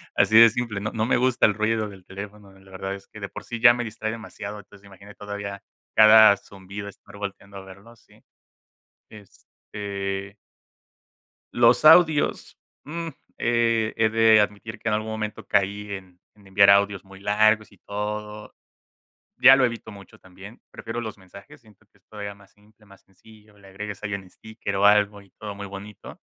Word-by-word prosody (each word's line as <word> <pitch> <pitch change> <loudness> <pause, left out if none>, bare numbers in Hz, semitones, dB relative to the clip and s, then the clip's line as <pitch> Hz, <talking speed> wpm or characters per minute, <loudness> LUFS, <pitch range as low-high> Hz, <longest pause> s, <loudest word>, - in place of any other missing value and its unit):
así 110 - +4
de 115 0 +9
simple, 110 -3 -4
no 110 - -4
no 110 -1 -1
me 120 - +2
gusta 125 0 +2
el 105 - +3
ruido 110 0 -1
del 95 -2 -15
teléfono, 100 +1 -10
la 95 0 -20
verdad 95 +1 -5
es 100 - -14
que 105 - -13
de 100 - -5
por - - -9
sí 120 - -6
ya 120 -1 +8
me 120 0 -3
distrae 110 0 -5
demasiado, 105 -2 -8
entonces 100 0 -18
imagínate 100 +1 -15
todavía 100 -1 -7 0.3
cada 110 -1 +8
zumbido 100 +1 -10
estar 100 +1 -17
volteando 100 0 -8
a 95 - -9
verlo, 100 +5 -15
sí, 115 - -25 0.9
este 100 -1 -8 1.2
los 120 +4 +3
audios, 160 -1 +4 0.3
mm, 165 +3 -6 0.3
he 115 -2 +1
he 110 -1 +2
de 110 0 +5
admitir 105 +2 -4
que - - -7
en - - 0
algún 110 +1 -4
momento 110 -1 -5
caí 100 +1 -1
en 95 -2 -9 0.2
en 100 - -21
enviar 100 +1 +5
audios 100 -1 +3
muy 95 0 -15
largos 110 +2 +2
y 100 - -21
todo, 105 +1 -6 0.8
ya 135 +1 +8
lo 130 - +4
evito 115 -2 -5
mucho 100 -1 -14
también, 95 +4 -15
prefiero 115 +1 -6
los 110 -3 -7
mensajes, 95 +1 -15
siento 110 -1 -24
que - - -29
esto 105 +2 -13
era 100 0 -6
más 100 -1 -22
simple, 105 +1 -26
más 100 -1 -19
sencillo, 105 +2 -21
le 100 -1 -18
agregas 100 +1 -8
ahí 105 -1 -4
un 95 -2 -7
sticker 110 0 -7
o 100 - +2
algo 105 0 +3
y 100 - -22
todo 105 -1 -7
muy 100 0 -8
bonito, 100 +1 -11
105 Hz, 180 wpm, -24 LUFS, 100-110 Hz, 1.2 s, de